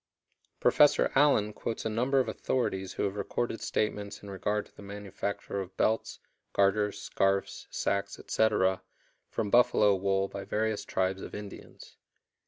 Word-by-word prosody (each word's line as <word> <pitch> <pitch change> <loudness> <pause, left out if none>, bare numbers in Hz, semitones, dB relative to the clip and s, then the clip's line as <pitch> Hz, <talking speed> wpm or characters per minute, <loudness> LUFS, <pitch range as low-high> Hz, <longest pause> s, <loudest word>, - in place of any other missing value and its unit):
Professor 145 -1 +5
Allen 135 -7 +4
quotes 115 +1 -4
a - - +2
number 125 +5 +1
of 130 - +1
authorities 95 -7 -2
who - - -2
have 100 -1 -1
recorded 115 +3 -2
statements 105 -1 -2
in 100 - -8
regard 105 +2 -1
to - - -24
the - - -12
manufacture 100 0 -4
of 95 0 -9
belts, 110 +1 +1 0.4
garters, 100 +1 +2
scarfs, 95 0 0
sacks, 100 0 -1
etc., 95 -4 +1 0.5
from 105 -2 -2
buffalo 110 -4 +5
wool 95 0 +1
by 100 0 -7
various 110 -1 -1
tribes 95 0 -1
of - - -7
Indians. 105 -1 -10
100 Hz, 145 wpm, -30 LUFS, 95-110 Hz, 0.5 s, Professor